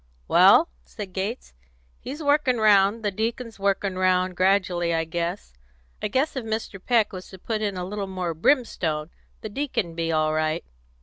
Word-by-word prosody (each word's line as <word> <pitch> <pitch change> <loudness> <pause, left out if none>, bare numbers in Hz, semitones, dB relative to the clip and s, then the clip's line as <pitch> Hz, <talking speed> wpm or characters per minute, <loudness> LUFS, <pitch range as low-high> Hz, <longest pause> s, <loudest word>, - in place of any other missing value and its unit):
"Well," - - +6 0.2
said 180 - -9
Gates, 200 - -4 0.5
"he's 295 +5 -7
workin' 285 -4 +2
round 210 0 +4
the 205 - +1
deacon's 225 +2 -4
workin' 195 -1 0
round 185 0 +2
gradually, 180 -3 +2
I 165 - +1
guess. 170 - -4 0.5
I - - 0
guess 265 +9 0
if 260 - -3
Mr. 220 -3 -4
Peck 230 -5 +2
was 185 -1 -8
to 190 - -11
put 215 +3 -3
in 200 -3 -2
a 180 - -3
little 200 +1 -4
more 185 -3 -3
brimstone, 165 - 0 0.3
the 220 - -6
deacon'd 210 - -3
be 165 0 -1
all 155 -1 +1
right. 155 +1 -1
195 Hz, 170 wpm, -24 LUFS, 175-220 Hz, 0.5 s, Well